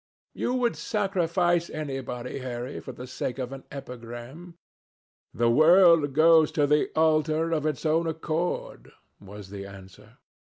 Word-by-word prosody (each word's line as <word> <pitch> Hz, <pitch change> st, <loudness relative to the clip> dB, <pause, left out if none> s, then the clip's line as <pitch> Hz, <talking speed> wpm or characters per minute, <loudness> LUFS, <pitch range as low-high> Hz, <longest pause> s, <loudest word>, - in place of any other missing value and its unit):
"You 250 Hz, -, -2 dB
would 245 Hz, -2 st, +1 dB
sacrifice 175 Hz, -4 st, 0 dB
anybody, 135 Hz, -4 st, -5 dB
Harry, 125 Hz, +1 st, -5 dB
for 130 Hz, -, -8 dB
the 125 Hz, 0 st, -9 dB
sake 130 Hz, 0 st, -4 dB
of 130 Hz, -1 st, -4 dB
an 135 Hz, -1 st, -9 dB
epigram." 125 Hz, +6 st, -9 dB, 0.7 s
"The 115 Hz, +1 st, +1 dB
world 165 Hz, 0 st, +5 dB
goes 160 Hz, +1 st, +5 dB
to 150 Hz, -2 st, +2 dB
the 150 Hz, +1 st, +2 dB
altar 155 Hz, +1 st, +2 dB
of 155 Hz, -2 st, 0 dB
its 155 Hz, -, -3 dB
own 165 Hz, +2 st, +2 dB
accord," 160 Hz, +2 st, -3 dB, 0.3 s
was 100 Hz, -1 st, -11 dB
the 100 Hz, -1 st, -7 dB
answer. 95 Hz, -1 st, -14 dB
155 Hz, 135 wpm, -26 LUFS, 125-165 Hz, 0.7 s, world